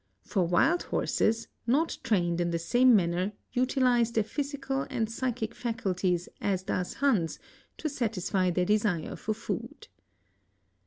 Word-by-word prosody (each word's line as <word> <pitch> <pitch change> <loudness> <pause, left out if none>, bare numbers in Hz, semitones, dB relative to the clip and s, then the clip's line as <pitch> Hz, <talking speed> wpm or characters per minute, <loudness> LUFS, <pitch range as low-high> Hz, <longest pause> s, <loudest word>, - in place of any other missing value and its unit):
For 185 -4 0
wild 320 - +3
horses, 225 +1 0 0.2
not 295 +7 +1
trained. 175 -5 +1
In 175 - +1
the 170 - 0
'same 245 +9 +4
manner 180 +1 +1 0.2
utilize 250 -2 +2
their 225 -2 +2
physical 275 +2 -3
and 240 -5 -1
physchic 235 -1 -3
faculties 190 -8 -1
as 190 -2 0
does 180 -1 -2
Hans, 220 - +1 0.4
to' 315 - -2
satisfy 205 - 0
their 180 +1 +1
desire 205 -5 +1
for 215 - -3
food. - - -6
220 Hz, 135 wpm, -29 LUFS, 180-250 Hz, 0.4 s, same